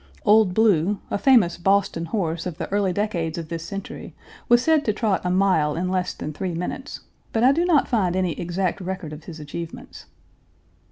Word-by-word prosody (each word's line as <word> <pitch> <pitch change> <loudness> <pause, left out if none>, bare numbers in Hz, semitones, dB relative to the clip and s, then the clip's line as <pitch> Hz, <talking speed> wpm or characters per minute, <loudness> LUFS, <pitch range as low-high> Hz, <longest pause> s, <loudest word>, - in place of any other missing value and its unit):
"Old 210 -3 +4
Blue," 205 -3 +3
a - - -1
famous 225 -11 +4
Boston 190 -2 +1
horse 165 -2 -2
of 170 -3 -6
the - - -4
early 200 -2 +1
decades 175 -4 -2
of 165 -2 -6
this 165 -1 -4
century, 195 +2 -7 0.3
was 240 +1 +5
said 315 -1 +3
to 215 - +1
trot 215 -2 0
a 180 - -1
mile 180 -5 +2
in 180 +2 -2
less 185 -1 -1
than 155 - -6
three 180 +2 -4
minutes, 180 +10 -5 0.3
but 225 - 0
I 260 - +7
do 335 +5 +1
not 325 -6 +3
find 190 -7 +1
any 185 -2 +1
exact 175 +3 -2
record 185 -4 -5
of 150 +1 -11
his 165 -3 -9
achievements. 160 +3 -8
185 Hz, 190 wpm, -23 LUFS, 170-210 Hz, 0.3 s, I